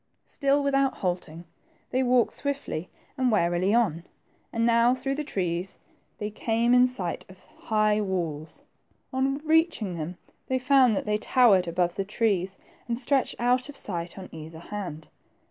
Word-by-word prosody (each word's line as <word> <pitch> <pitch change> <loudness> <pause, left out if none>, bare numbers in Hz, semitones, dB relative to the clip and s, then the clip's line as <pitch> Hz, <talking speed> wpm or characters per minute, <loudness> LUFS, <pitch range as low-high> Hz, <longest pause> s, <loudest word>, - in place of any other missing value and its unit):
Still, 280 0 +1
without 275 -1 +2
halting, 175 -2 -3 0.5
they 260 - +1
walked 250 -2 +3
swiftly 280 - -3 0.3
and 255 -2 +2
warily 175 -1 +2
on, 205 -8 +2 0.5
and 230 0 0
now 235 +1 +4
through 265 +1 -2
the 300 +2 -3
trees 180 - -3 0.4
they 210 0 -4
came 230 +3 +1
in 250 0 +7
THE - - +2
TWO - - -4
PEINGES. - - -10
93 180 - -2
sight 170 - -4
of 185 0 -16 0.2
high 215 -1 +2
walls. 165 -6 -4 0.5
On 270 +1 +1
reaching 315 - +2
them, 170 +2 -5 0.3
they 260 - +1
found 255 -3 +4
that - - -2
they 210 0 0
towered 210 -7 +4
above 175 +1 0
the 195 - 0
trees 195 -3 -1 0.3
and 235 -1 -1
stretched 270 +2 0
out 250 +3 +1
of 290 - -8
sight 175 -2 -3
on 190 - -8
either 160 0 -9
hand. 170 -3 -7
215 Hz, 170 wpm, -26 LUFS, 180-255 Hz, 0.5 s, in